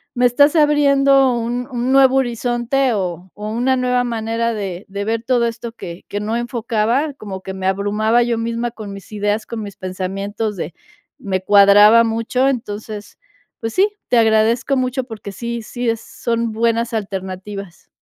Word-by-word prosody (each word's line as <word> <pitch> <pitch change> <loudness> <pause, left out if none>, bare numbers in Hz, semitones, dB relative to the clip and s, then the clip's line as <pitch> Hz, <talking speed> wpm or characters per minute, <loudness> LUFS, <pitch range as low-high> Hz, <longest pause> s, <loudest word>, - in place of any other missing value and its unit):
me 245 0 +3
estás 285 +6 +4
abriendo 280 -3 +4
un 240 +1 -2
un 245 +1 -1
nuevo 270 -1 +5
horizonte 245 +1 0
o 185 -2 -4
o 210 +1 -6
una 245 +4 +1
nueva 250 0 +1
manera 230 0 -1
de 195 -3 -5
de 200 +1 -4
ver 225 +1 -1
todo 240 -1 +2
esto, 230 0 -5
que 170 -5 -9
que 205 - -4
no 215 +2 -2
enfocaba, 240 +3 -1
como 195 -6 -7
que 190 - -6
me 190 0 -5
abrumaba 210 +4 +1
yo 235 -1 0
misma 230 +1 -2
con 215 -4 -8
mis 195 +1 -11
ideas, 210 +1 -1
con 225 -2 -5
mis 200 -1 -8
pensamientos 195 +3 -4
de 170 - -5 0.4
me 190 -2 -2
cuadraba 205 +3 +7
mucho. 230 +3 0
Entonces, 215 -4 -4 0.4
pues 225 -1 -4
sí, 395 +3 +3 0.2
te 245 - +3
agradezco 225 +4 +3
mucho 255 +1 -1
porque, 220 -4 -8
sí 235 +3 -5
sí 240 +2 -3
es 225 0 -1
son 230 -1 -2
buenas 230 +1 0
alternativas. 195 -2 -6
230 Hz, 165 wpm, -19 LUFS, 205-245 Hz, 0.4 s, cuadraba